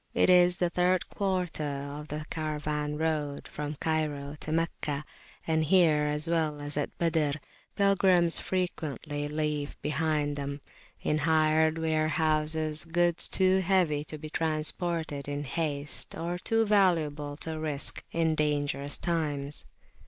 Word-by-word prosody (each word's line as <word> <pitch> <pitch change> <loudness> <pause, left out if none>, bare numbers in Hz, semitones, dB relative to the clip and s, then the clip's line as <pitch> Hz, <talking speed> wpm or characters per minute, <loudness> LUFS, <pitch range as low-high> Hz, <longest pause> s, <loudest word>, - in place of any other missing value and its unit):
It - - +4
is 180 0 +5
the 175 -1 0
third 180 +1 +1
quarter 185 -5 -2
of 145 +1 -5
the 150 +1 -5
caravan 150 -1 -2
road[FN#2] 150 -3 -2
from 150 0 -5
Cairo 150 -2 -2
to 155 - -5
Meccah; 155 -3 -1 0.4
and 160 -1 +1
here, 155 -3 +4
as 150 +2 -1
well 160 -3 0
as 145 0 -2
at 145 - -1
Al 170 -1 +2
Badr, 150 -3 +1 0.4
pilgrims 190 -4 +4
frequently 155 -5 -3
leave 150 -1 -2
behind 150 -1 0
them, 140 0 -4 0.4
in 150 - +1
hired 155 0 +3
warehouses, 155 -1 0
goods 175 0 +3
too 190 0 +4
heavy 175 -6 +2
to 155 - -6
be 155 0 -9
transported 160 -1 0
in 145 0 -3
haste, 145 0 -3
or 170 +2 -3
too 225 +3 +1
valuable 155 -8 +1
to 160 0 -4
risk 150 -2 -1
in 165 -1 +1
dangerous 145 -2 0
times. 145 - -1
155 Hz, 135 wpm, -29 LUFS, 150-170 Hz, 0.4 s, is